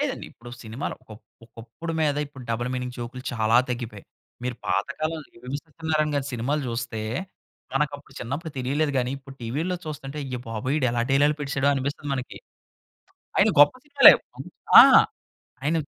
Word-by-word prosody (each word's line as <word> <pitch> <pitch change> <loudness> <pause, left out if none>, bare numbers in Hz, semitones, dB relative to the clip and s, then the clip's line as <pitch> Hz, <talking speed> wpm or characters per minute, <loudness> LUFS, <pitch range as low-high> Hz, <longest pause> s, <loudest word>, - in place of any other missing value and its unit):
లేదండి. - - -2
ఇప్పుడు 120 +1 -13
సినిమాలు 115 +4 -5
ఒక, - - -30 0.4
ఒకప్పుడు 115 +9 -8
మీద 150 -2 +2
ఇప్పుడు 135 -3 -12
డబుల్ 120 +2 -1
మీనింగ్ 125 -1 -4
జోక్‌లు 120 +2 -6
చాలా 110 0 +2
తగ్గిపోయాయి. 120 -5 -5 0.4
మీరు 125 -1 -3
పాత 95 +3 +1
కాలంలో 155 -1 -2 0.2
వివి 135 +3 -3
సత్యనారాయణ 155 -1 -1
గారు 140 -1 -1
సినిమాలు 135 +5 -1
చూస్తే, 115 -1 -4 0.7
మనకప్పుడు 145 -1 -2
చిన్నప్పుడు 145 +7 -5
తెలియలేదు 140 +4 0
గాని. 125 0 0
ఇప్పుడు 135 0 -13
టీవీల్లో 155 +11 -2
చూస్తుంటే, 150 -1 -6
అయ్యా 130 -2 -5
బాబోయ్! 115 +5 -2
వీడు 130 -5 +2
ఎలా 120 - +1
డైలాగులు 145 +2 +3
పెట్టేసాడో 140 -1 0
అనిపిస్తుంది 140 +1 -3
మనకి. 130 -1 -6 1.0
ఆయన 200 +3 +5
గొప్ప 145 - +7
సినిమాలే. 285 -1 +9 0.7
ఆ! - - +11 0.8
ఆయనవి. 155 +1 0
135 Hz, 150 wpm, -25 LUFS, 120-150 Hz, 1.0 s, ఆ